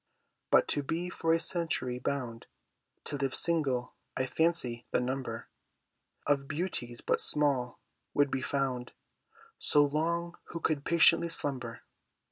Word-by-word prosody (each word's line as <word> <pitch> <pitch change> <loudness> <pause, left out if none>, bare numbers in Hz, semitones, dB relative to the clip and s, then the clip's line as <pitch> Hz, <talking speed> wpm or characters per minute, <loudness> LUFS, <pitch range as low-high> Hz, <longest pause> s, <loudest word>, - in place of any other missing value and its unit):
But - - +5
to 145 - +3
be 165 +5 -3
for 165 -1 0
a 165 - +4
century 165 -7 -1
bound 125 -4 -3 0.6
To 145 - -4
live 135 -1 -1
single, 140 -7 +1 0.2
I 130 - +1
fancy 130 -5 0
the - - +2
number 130 +2 -3 0.8
Of 140 -1 +1
Beauties 145 -7 -3
but - - +1
small 140 -5 +1 0.4
would 145 -1 +3
be 130 - -1
found 130 -2 -2 0.7
So 145 0 +5
long 170 +4 -1
who 170 - -6
could 150 -3 -1
patiently 170 0 +5
slumber. 130 -7 -3
140 Hz, 130 wpm, -31 LUFS, 125-165 Hz, 0.8 s, But